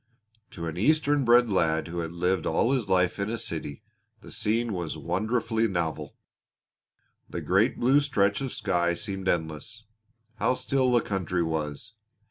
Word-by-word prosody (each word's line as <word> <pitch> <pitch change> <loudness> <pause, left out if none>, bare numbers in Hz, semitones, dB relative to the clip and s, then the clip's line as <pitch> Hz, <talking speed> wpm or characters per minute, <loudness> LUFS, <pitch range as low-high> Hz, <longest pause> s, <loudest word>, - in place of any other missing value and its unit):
To 85 - -7
an 80 0 -5
eastern 145 - +2
bred 120 -1 +5
lad 80 -4 +1
who 85 +1 -4
had 80 -1 -3
lived 90 0 0
all 120 - +2
his 130 -6 0
life 90 +1 +2
in 100 +1 -1
a 115 - -2
city 80 -5 -5 0.4
the - - -12
scene 115 +1 0
was 85 -4 -4
wonderfully 110 +5 0
novel. 85 -5 -3 1.1
The - - -4
great - - +2
blue 130 +4 +4
stretch 100 -7 +1
of 135 -2 -3
sky 85 -3 0
seemed 95 0 -5
endless. 85 +7 -2 0.5
How 130 - +1
still 130 0 +1
the 120 -1 +4
country 90 -4 -1
was! 80 +5 -4
100 Hz, 155 wpm, -27 LUFS, 85-120 Hz, 1.1 s, bred